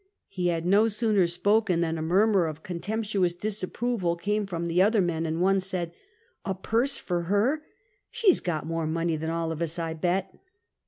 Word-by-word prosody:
" - - -58
He 185 -2 -2
had 170 -1 -1
no 205 +5 +4
sooner 210 -4 +2
spoken 185 +1 +2
than 165 -1 0
a 160 - -4
murmur 190 +2 +3
of 155 0 -7
con 175 -2 -5
temptuous 200 -3 -1
disapproval 210 -2 -1
came 205 +4 -1
from 170 -3 -3
the 170 +2 +2
other 210 +3 +4
men, 165 -3 0
and 160 +1 -2
one 195 +2 +3
said: 185 -3 -3 0.3
" 460 +2 -37
A 195 - -2
purse 235 +8 0
for 175 -2 -2
her! 235 +10 +2 0.5
She 445 -6 +4
's - - 0
got 160 -4 -3
more 165 -1 -2
money 165 +1 0
than 160 +1 -3
all 165 0 -1
of 160 0 -5
us, 165 0 -2
I 165 -1 -2
bet 180 +4 -1
180 Hz, 205 wpm, -27 LUFS, 165-210 Hz, 0.5 s, no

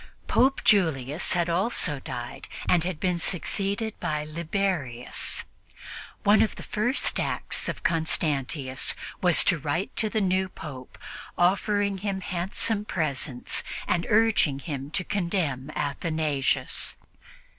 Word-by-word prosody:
Pope 270 +2 +3
Julius 160 - +3
had 175 -1 +1
also 175 - +1
died 120 -2 -7 0.2
and 175 -3 +4
had 175 -3 -3
been 180 -2 0
succeeded 200 +5 -1
by 150 -1 -1
Liberius. 155 -6 0 0.8
One 205 +1 +5
of 220 - +1
the - - -9
first 245 +6 0
acts - - -2
of - - -5
Constantius 145 -4 0 0.3
was 175 -5 +6
to 175 -5 +2
write 155 +7 -2
to 215 - +1
the 220 - 0
new 190 -1 +1
Pope, 130 -7 -9 0.4
offering 200 +2 +2
him 195 -1 -2
handsome 195 +4 0
presents 140 -8 -1 0.3
and 170 -1 0
urging 215 -10 +4
him 140 -2 -5
to 185 - 0
condemn 170 -9 -1
Athanasius. 150 -1 0
170 Hz, 120 wpm, -26 LUFS, 145-200 Hz, 0.8 s, was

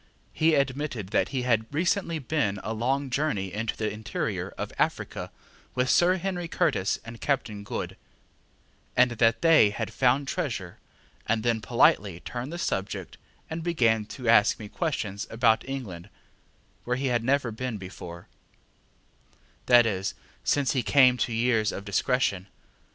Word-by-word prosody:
He 160 0 +3
admitted 135 -6 -1
that - - +1
he 130 -2 -2
had 115 -2 +1
recently 170 +2 0
been 125 -9 -1
a 110 - -3
long 130 +4 -1
journey 110 -10 -1
into 110 +1 -3
the 110 -1 -1
interior 105 0 -3
of - - -5
Africa - - -1 0.5
with 130 0 +2
Sir 180 +1 +4
Henry 180 -1 -3
Curtis 135 - +1
and 115 0 -10
Captain 120 -8 -1
Good, - - -5 1.0
and 125 0 +5
that 115 +2 +2
they 165 -10 +6
had 110 +2 -4
found 130 +2 +2
treasure, 120 - -3 0.5
and 110 0 +1
then 115 -2 +1
politely 105 -6 +3
turned 125 - -6
the 170 - -5
subject 100 - -3 0.3
and 160 +1 -5
began 115 -11 +1
to 125 +1 -7
ask 110 -2 +5
me 105 - -8
questions 110 - -3
about 115 +2 +2
England, 105 -9 -6 0.7
where 125 +1 -1
he 135 - -2
had 120 -1 +1
never 130 -1 +1
been 115 0 -4
before 90 -2 -9 1.4
that 120 -1 +7
is, 95 -3 -2 0.3
since 140 -2 +2
he 130 - +1
came 125 +2 +5
to 120 - -1
years 115 -2 +2
of 100 - -7
discretion. 100 -3 0
120 Hz, 150 wpm, -27 LUFS, 105-140 Hz, 1.4 s, that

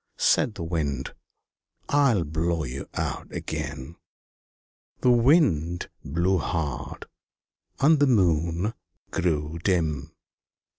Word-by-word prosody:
Said 110 - +2
the 90 - -5
Wind 75 -6 -2 0.7
"I 140 -4 +4
will 90 - +1
blow 80 +1 -1
you 65 0 -6
out - - -3
again." 65 +7 -5 1.0
The 125 - +5
Wind 115 - +3
blew 85 +5 +1
hard, 75 -5 -3 0.7
and 155 +2 +5
the 145 - +4
Moon 90 - +2 0.4
grew 80 -2 -1
dim. 80 -6 0
85 Hz, 100 wpm, -26 LUFS, 75-105 Hz, 1.0 s, The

